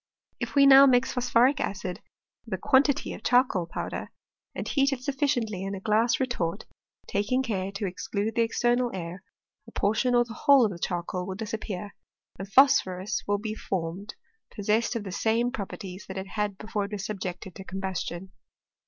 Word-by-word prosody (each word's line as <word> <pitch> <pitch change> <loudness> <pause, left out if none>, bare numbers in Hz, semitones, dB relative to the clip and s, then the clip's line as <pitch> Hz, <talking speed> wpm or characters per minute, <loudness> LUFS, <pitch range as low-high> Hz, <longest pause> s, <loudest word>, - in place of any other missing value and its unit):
If - - -5
now 275 -1 +9
we 270 - +5
mix 250 +1 +2
phpsphprip 250 +2 +3
acid 190 -2 -3 0.5
with 205 - -2
a - - -6
quantity 275 - +2
of - - -9
ch^coal 245 -9 +2
powder, - - -5 0.5
apd - - -3
fie^t 275 -1 +2
it 265 - -4
BufiBctiently 255 -7 -1
in 195 +1 -3
a - - -6
glass 220 +4 +2
retort, 210 -8 -2 0.4
taking 210 +6 0
care 195 -5 -2
to 200 +1 -3
exclude 200 +3 -3
the 235 - +1
external 240 +2 +1
air, 175 +1 -6 0.4
a - - -12
portion 225 +5 +1
or 240 0 +4
the 230 - -9
whole 275 0 +5
of 210 - -1
the 175 - -8
ch^rcQ^ 180 +1 -3
ydll 190 -1 -5
disappear, 210 -2 -5 0.5
and 195 +1 -7
phosphorus 200 -7 +4
will 205 0 +2
be 215 +1 -4
form 185 -1 -4
ed - - -7 0.4
pp^s^ssed 215 +4 +1
of 230 - -2
the 195 - -6
same 230 +5 +1
properties 195 -4 -7
that 190 - -7
it 190 0 -5
h^d 210 -2 -2
before 210 -1 -3
it 200 - -9
yras 205 - -3
subjected 190 -3 -5
to 195 - -9
combustion. 190 -1 -5
210 Hz, 180 wpm, -27 LUFS, 190-245 Hz, 0.5 s, now